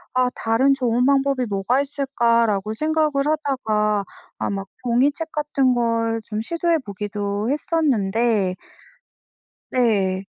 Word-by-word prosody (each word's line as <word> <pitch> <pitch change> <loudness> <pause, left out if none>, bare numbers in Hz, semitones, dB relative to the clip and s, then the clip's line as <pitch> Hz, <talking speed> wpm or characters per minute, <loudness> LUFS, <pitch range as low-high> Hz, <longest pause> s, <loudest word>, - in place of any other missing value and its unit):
'아, 255 0 +3
다른 255 +5 +2
좋은 250 -1 +1
방법이 275 -2 +2
뭐가 205 +7 +1
있을까?'라고 235 -7 0
생각을 310 +2 +1
하다가 220 -9 0 0.3
아 - - -2
막 195 -1 -4
종이책 280 +7 +1
같은 280 -4 +1
걸 230 -1 0
좀 215 -1 -4
시도해 335 +4 0
보기도 205 +1 -3
했었는데 230 - +1 1.2
네. 200 -6 +1
235 Hz, 235 characters per minute, -22 LUFS, 210-275 Hz, 1.2 s, 아